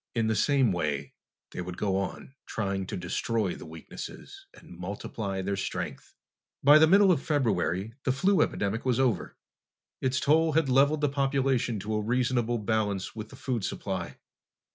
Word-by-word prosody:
In 115 -1 +1
the 110 0 +1
same 135 +1 +3
way, 75 -5 -2 0.4
they - - -5
would 90 0 -6
go 100 -3 0
on, 100 +6 -4
trying 95 -3 -2
to - - -4
destroy 95 +3 -1
the - - -10
weaknesses 80 0 -9
and - - -14
multiply 95 +2 -4
their 100 +1 -1
strength. 95 - -5 0.5
By 145 +2 +8
the 160 - +7
middle 195 +2 +6
of 160 - +2
February 110 - 0
the 130 - +2
flu 185 +6 +3
epidemic 105 -1 0
was 125 -1 +1
over. 130 -4 0 0.6
Its 130 -1 +1
toll 160 +2 +3
had 160 -3 +2
leveled 140 +4 +4
the 145 - +3
population 135 -4 +1
to 110 +2 -3
a 105 - 0
reasonable 120 +1 +1
balance 105 -3 -1
with 110 -1 -6
the - - -12
food 120 -6 -3
supply. - - -4
115 Hz, 165 wpm, -28 LUFS, 100-135 Hz, 0.6 s, By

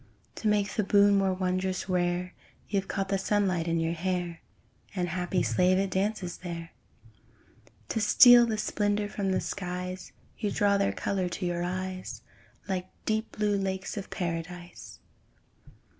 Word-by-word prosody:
To 220 - -2
make 205 -1 +2
the 210 - +1
boon 200 0 +5
more 195 -1 +2
wondrous 185 0 -1
rare 180 0 0 0.3
You've 195 -2 -1
caught 195 -1 -2
the 195 -1 +1
sunlight 190 -4 +1
in 165 0 +1
your 165 0 0
hair, 175 -1 -2 0.5
And, 180 -2 -1
happy 180 +1 0
slave, 185 0 +3
it 195 0 0
dances 190 -2 -1
there. 170 -2 -7 1.2
To 225 - -1
steal 240 +3 +8
the 220 -2 -1
splendour 205 0 0
from 200 -2 -2
the 190 - +2
skies, 180 -1 -5 0.3
You 210 - 0
draw 200 0 +2
their 200 - +2
colour 190 -2 -1
to 180 - -4
your 175 0 -1
eyes, 185 +1 -4 0.4
Like 185 -1 -2 0.2
deep 220 +1 -1
blue 210 -1 +1
lakes 190 -1 -2
of 200 -2 -6
Paradise. 175 0 -5
185 Hz, 150 wpm, -28 LUFS, 180-200 Hz, 1.2 s, steal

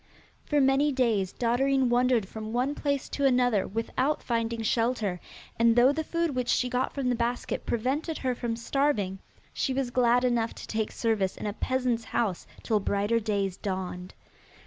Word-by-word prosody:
For 295 - +2
many 275 +2 +3
days 225 -8 +1
Dotterine 260 +3 +1
wandered 245 -3 +2
from 220 +2 -7
one 255 +4 +1
place 280 -2 -2
to 280 - -3
another 245 -6 +2
without 255 +7 -1
finding 230 -1 -1
shelter, 225 -5 0 0.4
and 230 0 +5
though 245 +3 +6
the 315 +2 -2
food 335 -1 -1
which 250 -1 -2
she 250 +1 +1
got 250 +1 0
from 275 -3 -3
the 245 - +2
basket 235 +1 -2
prevented 275 +8 -1
her 255 -1 -1
from 235 -1 -3
starving, 230 -6 0 0.3
she 260 - -1
was 265 -2 -1
glad 245 0 +3
enough 235 -2 +1
to - - -8
take 220 -1 -2
service 215 -5 0
in - - -6
a 205 - -2
peasant's 250 -1 -1
house 215 -7 -1 0.2
till 220 -3 +1
brighter 205 +3 +1
days 200 -4 -1
dawned. 185 -2 -5
240 Hz, 170 wpm, -28 LUFS, 220-260 Hz, 0.4 s, though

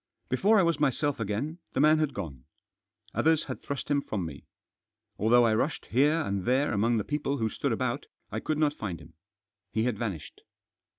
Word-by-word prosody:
Before 200 - +4
I - - +5
was 170 -3 +1
myself 145 -1 +1
again, 115 - -2
the - - -1
man 155 +2 +5
had 155 -3 0
gone. 65 -6 -6 0.7
Others 160 0 +3
had - - -6
thrust 140 0 -4
him 140 -1 +3
from 100 -9 -3
me. 75 -4 -8 0.7
Although 120 +4 +5
I 110 - +3
rushed 140 +7 -1
here 150 +7 +3
and 100 -9 -2
there 130 +3 +2
among 115 +3 +2
the 105 - 0
people 145 +1 -1
who 110 -3 0
stood - - -1
about - - -1 0.2
I - - -2
could 155 - -2
not 150 -1 +2
find 95 - -5
him. 80 +4 -15 0.6
He 110 - 0
had 120 -4 -1
vanished. 95 -11 -5
130 Hz, 190 wpm, -29 LUFS, 105-150 Hz, 0.7 s, I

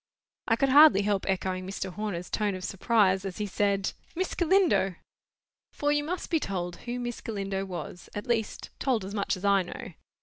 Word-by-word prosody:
I 225 - +4
could 270 +4 +1
hardly 285 -7 +8
help 200 -1 0
echoing 185 -1 -1
Mr. 190 -1 -4
Horner's 200 -4 -4
tone 210 -3 0
of 185 - -7
surprise 195 0 +2
as 195 -2 -5
he 210 - -1
said— 200 -1 0 0.2
"Miss 370 +2 -1
Galindo!" 345 - +3 0.8
For, 290 0 0
you 295 0 +2
must 360 +5 -4
be 325 - +3
told 175 -7 -3
who 245 +1 -2
Miss 240 -1 -4
Galindo 195 -3 -3
was; 175 -1 -7
at 205 - -4
least, 230 -3 -2
told 245 -8 0
as 195 - -7
much 200 -2 -1
as 185 - -6
I 200 -1 +5
know. 180 0 -7
200 Hz, 190 wpm, -28 LUFS, 190-240 Hz, 0.8 s, hardly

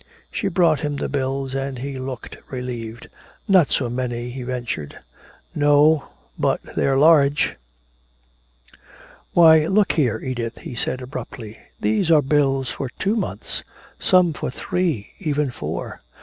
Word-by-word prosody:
She 200 - -2
brought 170 -4 +3
him 145 -2 -2
the 140 - -2
bills 135 -1 -2
and 135 -1 -3
he 135 +1 -5
looked 130 -1 -6
relieved. 120 -3 -6 0.4
"Not 185 -7 +5
so 130 - 0
many," 120 0 -3
he 130 +1 -6
ventured. 120 - -4 0.6
"No, 145 +1 +4 0.3
but - - +2 0.2
they're 135 -1 +2
large." 145 -1 +5 1.8
"Why, 160 -2 +7
look 200 +1 +3
here, 125 -8 +1
Edith," 120 -2 -4
he - - -8
said 125 +2 -3
abruptly, 120 -4 -8 0.2
"these 110 - +1
are 155 -3 +6
bills 135 -2 +2
for 135 - -4
two 200 +3 0
months 225 - -4 0.4
some 180 -3 +4
for - - -4
three, 155 - -2
even 150 -3 0
four!" - - -5
135 Hz, 135 wpm, -22 LUFS, 125-155 Hz, 1.8 s, Why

